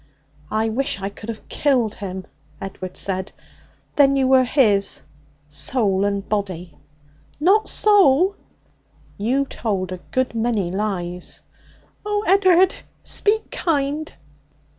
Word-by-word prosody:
'I 220 +1 0
wish 245 -1 -1
I 195 0 -3
could 210 +2 -11
have 220 -2 -7
killed 250 -7 +1
him!' 190 -2 -6 0.3
Edward 185 -1 -7
said. 190 0 -2 0.6
'Then 275 -1 +5
you 265 -1 +2
were 260 0 +5
his 220 -7 +2 0.4
soul 195 - +2
and 200 0 -2
body?' 185 -6 -3 0.6
'Not 390 +8 +3
soul!' 390 -3 +4 0.8
'You 255 +7 +1
told 195 -8 -3
a 185 - -5
good 260 -2 0
many 225 -6 0
lies.' 180 -3 -4 0.6
'Oh, 415 0 -1
Ed'ard, 375 -1 +5 0.3
speak 430 +1 +1
kind!' 300 -1 -1
225 Hz, 115 wpm, -21 LUFS, 195-285 Hz, 0.8 s, Then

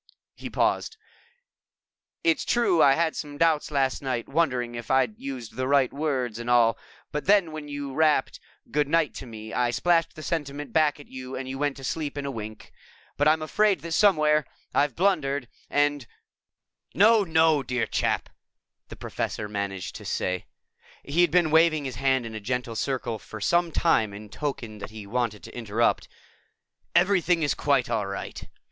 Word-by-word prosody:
He - - -8
paused. 445 - 0 1.3
"It's 330 -4 +2
true 235 -9 +2
I 135 - +7
had 165 +1 0
some 145 -1 -6
doubts 160 -1 +2
last 135 -3 0
night, 130 -4 -2
wondering 125 -6 0
if 120 -1 -7
I'd 130 -5 +2
used 130 -5 -7
the 130 0 -1
right 140 -2 +3
words 130 -6 -2
and 120 +1 -5
all, 120 -2 +5 0.4
but 150 - -3
then 195 -5 +4
when 155 -1 -7
you 145 -1 -5
rapped 155 -2 +2 0.3
'Good 145 0 +1
night' 160 -1 +2
to 130 - -8
me, 110 -1 -9
I 125 -1 +1
splashed 165 +7 +1
the 155 - -9
sentiment 145 -4 -4
back 155 -2 +3
at 145 - -13
you 130 0 -8
and 130 0 -5
went 145 -1 -1
to 135 - -10
sleep 145 +1 -3
in 140 - -3
a 140 - -2
wink. 110 -3 -8 0.4
But 145 - +2
I'm 155 0 +3
afraid 205 +5 +2
that 170 - -7
somewhere 155 -5 +4 0.3
I've 145 -3 +2
blundered 145 -8 +1 0.2
and 145 -3 +1 0.4
" - - -43
"No, 225 -1 +6
no, 160 -3 +3
dear 125 -3 -1
chap," - - -1 0.6
the - - -9
Professor 105 - -4
managed 100 -2 -4
to - - -11
say. 90 0 -2 0.6
He 155 +5 +1
had 175 - +5
been 170 -1 +3
waving 160 -2 +4
his 130 -4 -5
hand 130 -2 +1
in 115 - -7
a 110 - -5
gentle 120 +2 -3
circle 120 -3 -2
for 110 - -10
some 170 +10 +2
time 110 -12 +2
in 105 +1 -10
token 120 -6 -5
that 100 - -7
he 110 -2 -9
wanted 110 -1 -2
to - - -11
interrupt. 115 -1 0 0.9
"Everything 180 -2 +3
is 145 - +2
quite 140 -4 +1
all 110 -4 -1
right. 100 0 -6
140 Hz, 180 wpm, -26 LUFS, 120-160 Hz, 1.3 s, I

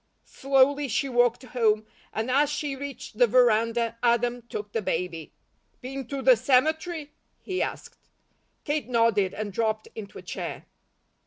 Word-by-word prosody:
Slowly 275 +1 +2
she 265 +4 0
walked 245 0 +2
home 220 -4 +1 0.3
and 225 +3 -2
as 285 +2 +3
she 295 -1 -3
reached 275 -5 -8
the 245 - +6
veranda, 230 -1 +2
Adam 240 0 +2
took 205 0 -5
the 225 - -1
baby. 170 -3 -3 0.5
"Been 265 0 -6
to 275 0 -4
the 255 0 +7
cemetery?" 305 +6 +1 0.3
he 370 -1 -2
asked. - - -5 0.6
Kate 295 -2 -2
nodded 230 -5 +2
and 210 -2 -4
dropped 220 0 -1
into 205 -3 -8
a - - -10
chair. - - -6
245 Hz, 145 wpm, -26 LUFS, 220-275 Hz, 0.6 s, the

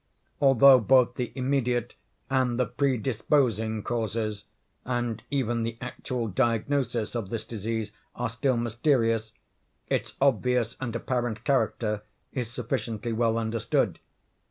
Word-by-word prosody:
Although 135 -1 +7
both 125 +1 +4
the 125 -1 -3
immediate 125 -3 0 0.3
and 130 -2 +1
the 125 - +3
predisposing 115 -3 +1
causes, 110 -3 -2 0.4
and 120 -3 -2
even 120 -4 0
the 115 0 -3
actual 125 -1 -4
diagnosis, 120 +1 0
of 110 -5 -3
this 115 0 -3
disease 110 -1 -3 0.2
are - - -1
still 120 +2 0
mysterious, 115 -2 +1 0.6
its - - -1
obvious 125 -2 +2
and 120 -3 -4
apparent 120 -2 -2
character 110 -5 +1 0.3
is 125 -4 -3
sufficiently 115 -2 -3
well 115 0 +2
understood. 115 0 0
120 Hz, 115 wpm, -27 LUFS, 110-130 Hz, 0.6 s, Although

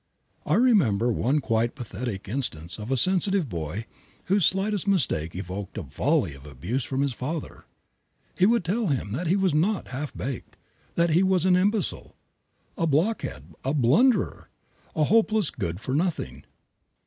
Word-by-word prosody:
I 150 - +3
remember 150 - +4
one 135 +6 +1
quite 115 -1 0
pathetic 115 -4 -5
instance 90 - -4
of 105 +2 -6
a 135 - +2
sensitive 190 - +2
boy 85 +2 -4 0.4
whose 195 -2 +4
slightest 195 +1 0
mistake 110 - +1
evoked 95 +2 -6
a 110 - -3
volley 100 - 0
of 70 0 -13
abuse 90 - -3
from 135 +2 -2
his 140 -2 0
father. 145 +6 -5 0.7
He 185 - +4
would 230 -5 +2
tell 210 +5 0
him 130 - -1
that 160 - -2
he 180 - +3
was 190 -4 +2
not 185 +7 +1
"half 140 +3 -4
baked," 130 -2 -5 0.4
that 170 -1 +2
he 170 +4 +4
was 185 -2 +2
"an 185 -1 +5
imbecile," 200 +2 0 0.6
"a 165 - 0
blockhead," 165 +10 -1
"a 135 +3 0
blunderer," 155 - +3 0.5
"a 155 - +2
hopeless 215 0 +3
good 85 +2 -4
for 130 - -4
nothing." 145 - -2
145 Hz, 160 wpm, -26 LUFS, -, 0.7 s, an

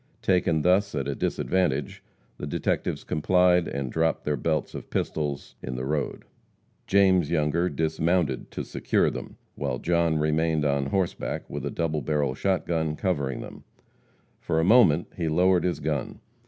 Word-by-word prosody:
Taken 85 -4 +2
thus, 95 +1 +2
at 70 -2 -2
a 70 - -1
disadvantage, 95 +6 -1 0.4
the 75 - -4
detectives - - -1
complied, 90 +2 +3
and 70 -3 -3
dropped 80 -1 0
their 75 - +1
belts 80 +1 -1
of - - -8
pistols 75 -3 -3
in 65 - -5
the 65 +1 -3
road. 75 +1 -2 0.6
James 95 -5 +4
Younger 85 +2 +1
dismounted 80 -2 0
to - - -5
secure - - 0
them, - - -8 0.2
while 65 - -3
John 85 +1 +1
remained 75 0 +1
on 70 -1 +1
horseback 95 +4 -2
with - - -5
a - - -1
double 80 -2 -1
barrel 75 -4 0 0.3
gun 80 -2 -1
covering 70 -8 -1
them. - - -10 0.8
For 80 - -1
a - - +2
moment 90 -6 +5
he 85 -3 -1
lowered 90 +3 +3
his 90 - -1
gun. 75 -3 -3
80 Hz, 155 wpm, -26 LUFS, 75-90 Hz, 0.8 s, moment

